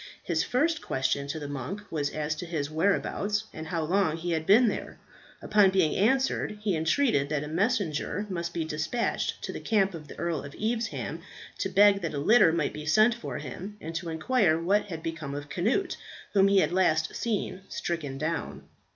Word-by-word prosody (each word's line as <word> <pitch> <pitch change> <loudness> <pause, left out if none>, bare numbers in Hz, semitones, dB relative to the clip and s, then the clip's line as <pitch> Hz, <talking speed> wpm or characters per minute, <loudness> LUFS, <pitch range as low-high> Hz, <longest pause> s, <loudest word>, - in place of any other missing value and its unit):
His 160 -2 0
first 310 - +1
question 135 +1 -1
to 150 +3 -3
the 145 -2 -5
monk 145 +9 -5
was 145 -3 -1
as 155 0 -2
to 175 - -6
his 155 -3 -3
whereabouts, 200 +4 0
and 160 0 -7
how 165 -2 -1
long 170 -1 +1
he 175 +1 -3
had 160 -1 -1
been 225 +5 +6
there. - - -3 0.5
Upon 205 -2 +5
being 185 -5 +2
answered, 245 0 +1
he 200 -4 +1
entreated 160 - +2
that 150 -1 -1
a - - -5
messenger 200 - 0
might 170 -3 -3
be 170 -2 -2
despatched 160 +9 -2
to - - -4
the - - -5
camp 195 -4 +1
of 155 -3 -8
the - - -11
Earl 170 -3 -2
of 140 - -9
Evesham, 225 +1 -2 0.4
to - - -1
beg 205 0 +5
that 165 -3 -3
a - - -2
litter 165 +4 +5
might 160 -3 0
be 150 0 -7
sent 215 +8 +5
for 235 - -6
him, 185 +9 -7
and 160 -1 -6
to 165 +1 -4
inquire 165 0 +2
what 195 +5 +2
had 165 -5 -7
become 160 -4 -4
of 145 0 -6
Cnut, 240 - 0 0.4
whom 195 -1 +5
he 195 -1 +5
had - - +1
last 165 -4 +2
seen 210 -4 -2
stricken 150 -6 -3
down. 160 +3 -3
170 Hz, 195 wpm, -28 LUFS, 155-205 Hz, 0.5 s, been